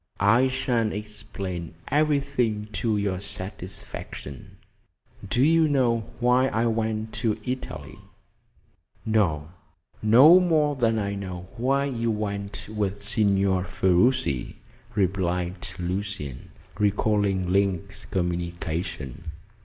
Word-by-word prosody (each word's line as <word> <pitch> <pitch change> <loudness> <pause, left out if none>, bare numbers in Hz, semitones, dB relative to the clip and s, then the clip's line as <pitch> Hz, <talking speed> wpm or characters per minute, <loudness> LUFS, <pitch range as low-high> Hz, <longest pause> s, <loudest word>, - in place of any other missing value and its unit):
"I 115 +6 +5
shall 130 -4 0
explain 95 -5 -6
everything 140 -7 +1
to 110 0 0
your 100 -3 -1
satisfaction. 95 - -7 0.7
Do 120 +5 +2
you 160 +1 +5
know 120 -6 +1
why 125 +2 +4
I 115 -1 0
went 110 -1 -1
to 110 -3 +1
Italy?" 130 +1 -5 1.1
"No; 80 -9 +1 0.5
no 130 +12 +8
more 155 -5 +2
than 115 -3 +2
I 100 -1 -1
know 90 -2 -6
why 135 +4 +1
you 115 -4 -1
went 100 -2 -3
with 100 -2 -3
Signor 100 -3 +2
Ferruci," 95 - +1 0.4
replied 90 -2 0
Lucian, 90 -7 -4 0.3
recalling 100 -2 +1
Link's 100 0 0
communication. 85 - -3
105 Hz, 100 wpm, -25 LUFS, 95-120 Hz, 1.1 s, no